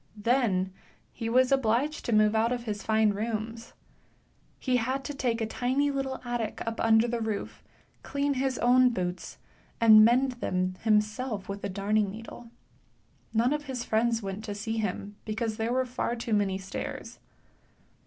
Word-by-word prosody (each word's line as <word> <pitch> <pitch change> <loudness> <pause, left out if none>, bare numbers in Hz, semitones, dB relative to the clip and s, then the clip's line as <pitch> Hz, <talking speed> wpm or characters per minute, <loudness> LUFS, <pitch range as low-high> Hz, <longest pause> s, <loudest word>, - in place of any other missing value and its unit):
Then 205 -5 +1 0.4
he 225 - -4
was 255 +2 +3
obliged 270 +4 +1
to - - -1
move 215 -1 +4
out 225 +2 +2
of 245 -1 -2
his 210 -3 -4
fine 220 -1 +3
rooms. 225 +2 -4 0.8
He 255 -2 +1
had 260 +3 -1
to 290 - -5
take 240 -4 -1
a - - +1
tiny 260 +6 0
little 270 -1 -3
attic 240 -3 -3
up 230 0 -4
under 225 +1 +4
the 235 -1 -2
roof, 220 -2 -4 0.4
clean 280 0 -1
his 265 -1 -1
own 250 +1 +5
boots, 180 -5 -4 0.4
and 220 -2 +8
mend 255 +4 +4
them 185 0 0
himself 215 0 0
with 200 0 -6
a - - -2
darning 200 +2 0
needle. 225 +3 -10 0.8
None 235 +5 +2
of 300 0 -3
his 260 -3 -4
friends 230 0 +1
went 195 +2 -5
to 205 -2 -4
see 220 +2 -3
him, 205 0 -4
because 220 0 -3
there 225 +1 -1
were 260 +1 +1
far 245 -1 -2
too 230 -1 -3
many 200 -2 +1
stairs. 190 0 -6
225 Hz, 165 wpm, -28 LUFS, 210-250 Hz, 0.8 s, and